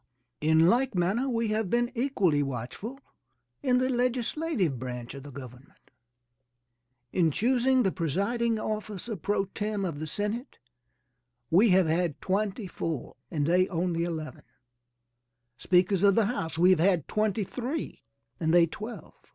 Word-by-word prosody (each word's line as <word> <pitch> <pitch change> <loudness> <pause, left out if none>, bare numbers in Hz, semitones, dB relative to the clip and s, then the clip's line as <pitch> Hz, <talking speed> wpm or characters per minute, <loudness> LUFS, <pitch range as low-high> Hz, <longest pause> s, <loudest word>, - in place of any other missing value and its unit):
In 160 +2 +4
like 245 +3 +2
manner 200 +10 +1
we 230 -2 0
have 215 -2 0
been 240 +3 +1
equally 200 - +1
watchful 135 - -5 0.6
in 255 -3 +3
the 255 +1 +2
legislative 245 - 0
branch 125 -1 -6
of 140 - -8
the 145 - -10
government. 130 -1 -12 1.2
In 170 -3 +3
choosing 255 - +2
the 190 - +2
presiding 200 - 0
officer, 215 0 -4
pro 200 +2 -1
tem, 205 0 -3
of 160 -5 -4
the 155 - -4
Senate 210 - -4 0.9
we 200 +7 +6
have 185 -1 +5
had 165 -1 0
twenty 200 +2 -1
four 165 -6 -4
and 150 -4 -1
they 180 +3 +3
only 170 -2 -1
eleven; 160 -3 -5 1.2
speakers 180 +1 +3
of 200 -1 +5
the 225 - +4
house 165 -8 -3
we 180 +3 +5
have 185 - +4
had 175 -3 +2
twenty 215 0 0
three 255 - -5 0.4
and 160 -1 +1
they 175 0 +6
twelve. 215 +8 -8
190 Hz, 145 wpm, -28 LUFS, 165-230 Hz, 1.2 s, we